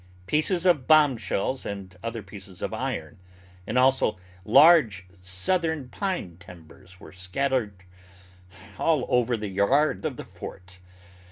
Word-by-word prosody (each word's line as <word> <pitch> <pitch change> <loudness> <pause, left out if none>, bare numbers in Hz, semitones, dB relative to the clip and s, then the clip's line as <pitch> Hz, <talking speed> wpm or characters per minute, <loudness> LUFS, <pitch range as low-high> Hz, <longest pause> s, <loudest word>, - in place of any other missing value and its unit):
Pieces 165 - +1
of 155 -9 +3
bombshells 135 -5 +2
and 95 -2 -7
other 115 -1 -5
pieces 100 -2 -10
of - - -3
iron, - - -4 0.5
and 115 - -1
also 130 -4 +3 0.3
large 115 - +5 0.2
southern 145 - -1
pine 175 - -4
timbers 90 +1 -15
were - - -13
scattered 100 +1 -2 1.0
all 155 -6 +2
over 125 -1 +2
the 105 -2 -5
yard 130 - +1
of 150 -6 -3
the - - -8
fort. 90 0 -11
115 Hz, 120 wpm, -25 LUFS, 95-150 Hz, 1.0 s, large